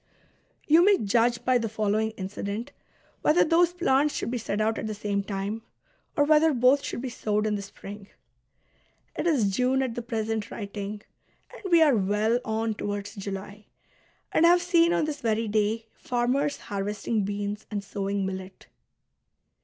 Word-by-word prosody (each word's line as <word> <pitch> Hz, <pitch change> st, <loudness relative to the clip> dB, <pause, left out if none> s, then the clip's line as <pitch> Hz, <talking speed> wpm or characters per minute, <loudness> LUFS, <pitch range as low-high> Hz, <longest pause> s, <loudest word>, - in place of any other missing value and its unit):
You 320 Hz, +3 st, +6 dB
may 400 Hz, +1 st, +5 dB
judge 235 Hz, +3 st, +1 dB
by 255 Hz, -1 st, +4 dB
the 225 Hz, -1 st, -2 dB
following 215 Hz, 0 st, 0 dB
incident 200 Hz, +3 st, -5 dB, 0.5 s
whether 310 Hz, +4 st, +4 dB
those 335 Hz, +2 st, +3 dB
plants 300 Hz, -5 st, +2 dB
should -, -, -2 dB
be 245 Hz, -, -2 dB
set 210 Hz, -1 st, -3 dB
out 220 Hz, +1 st, +1 dB
at -, -, -4 dB
the 215 Hz, -, -4 dB
same 200 Hz, -1 st, -1 dB
time, 200 Hz, +2 st, -4 dB, 0.6 s
or 290 Hz, -, +5 dB
whether 310 Hz, +1 st, +4 dB
both 255 Hz, +3 st, +4 dB
should -, -, -4 dB
be 260 Hz, -, -3 dB
sowed 210 Hz, -2 st, -1 dB
in 215 Hz, -, 0 dB
the 205 Hz, -, -2 dB
spring. 200 Hz, 0 st, -10 dB, 1.1 s
It -, -, -1 dB
is 240 Hz, -, +2 dB
June 260 Hz, +3 st, +2 dB
at 255 Hz, -3 st, -2 dB
the 240 Hz, -, -4 dB
present 225 Hz, -2 st, -3 dB
writing, 205 Hz, 0 st, -6 dB, 0.5 s
and 405 Hz, -7 st, -7 dB
we 335 Hz, -1 st, +7 dB
are 290 Hz, -5 st, +4 dB
well 210 Hz, +3 st, +1 dB
on 220 Hz, 0 st, -1 dB
towards 205 Hz, -1 st, -4 dB
July; 200 Hz, 0 st, -7 dB, 0.6 s
and 335 Hz, -, +5 dB
I -, -, +7 dB
have 350 Hz, 0 st, +4 dB
seen 340 Hz, -1 st, +4 dB
on 315 Hz, -, +2 dB
this 300 Hz, -1 st, -4 dB
very 225 Hz, -1 st, 0 dB
day 215 Hz, +2 st, 0 dB
farmers 255 Hz, +4 st, 0 dB
harvesting 205 Hz, +2 st, -2 dB
beans 205 Hz, +1 st, -4 dB
and 205 Hz, -2 st, -3 dB
sowing 200 Hz, 0 st, -2 dB
millet. 190 Hz, 0 st, -7 dB
220 Hz, 170 wpm, -27 LUFS, 205-265 Hz, 1.1 s, we